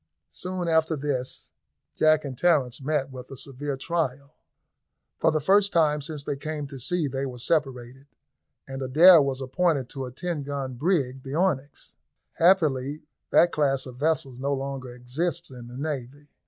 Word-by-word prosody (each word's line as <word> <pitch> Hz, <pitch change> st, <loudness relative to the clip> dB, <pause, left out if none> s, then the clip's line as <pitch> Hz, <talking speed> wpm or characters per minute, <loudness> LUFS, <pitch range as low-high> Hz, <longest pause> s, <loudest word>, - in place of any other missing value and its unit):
Soon 180 Hz, -1 st, -4 dB
after 160 Hz, 0 st, +2 dB
this 135 Hz, -3 st, -4 dB, 0.4 s
Jack 155 Hz, -1 st, +3 dB
and 135 Hz, -2 st, -5 dB
Terence 135 Hz, -4 st, +2 dB
met 140 Hz, -1 st, -1 dB
with 130 Hz, -1 st, -9 dB
a 135 Hz, -, -9 dB
severe 140 Hz, +1 st, -5 dB
trial. 140 Hz, -3 st, -2 dB, 0.9 s
For -, -, +4 dB
the 155 Hz, -, +1 dB
first 200 Hz, +6 st, +3 dB
time 150 Hz, -3 st, +2 dB
since 150 Hz, -1 st, -4 dB
they 140 Hz, -, -3 dB
came 150 Hz, 0 st, -4 dB
to 135 Hz, -2 st, -8 dB
sea 170 Hz, +4 st, 0 dB
they 135 Hz, +1 st, -3 dB
were 125 Hz, -1 st, -7 dB
separated, 135 Hz, -1 st, -1 dB, 0.6 s
and 135 Hz, 0 st, -6 dB
Adair 160 Hz, +6 st, +7 dB
was 135 Hz, -1 st, -1 dB
appointed 135 Hz, -1 st, 0 dB
to 135 Hz, -2 st, -5 dB
a 125 Hz, -, -7 dB
ten 170 Hz, +3 st, -3 dB
gun 140 Hz, -2 st, -4 dB
brig, 135 Hz, -2 st, 0 dB
the 135 Hz, +2 st, -6 dB
Onyx. 145 Hz, -6 st, -2 dB, 0.4 s
Happily 155 Hz, -5 st, +2 dB, 0.2 s
that 175 Hz, -, +5 dB
class 135 Hz, -3 st, +1 dB
of 125 Hz, -2 st, -10 dB
vessels 140 Hz, -3 st, -1 dB
no 140 Hz, +1 st, 0 dB
longer 135 Hz, -2 st, -5 dB
exists 155 Hz, +8 st, -3 dB
in 125 Hz, -2 st, -10 dB
the 120 Hz, +1 st, -9 dB
navy. 145 Hz, -1 st, -5 dB
140 Hz, 165 wpm, -26 LUFS, 130-160 Hz, 0.9 s, Adair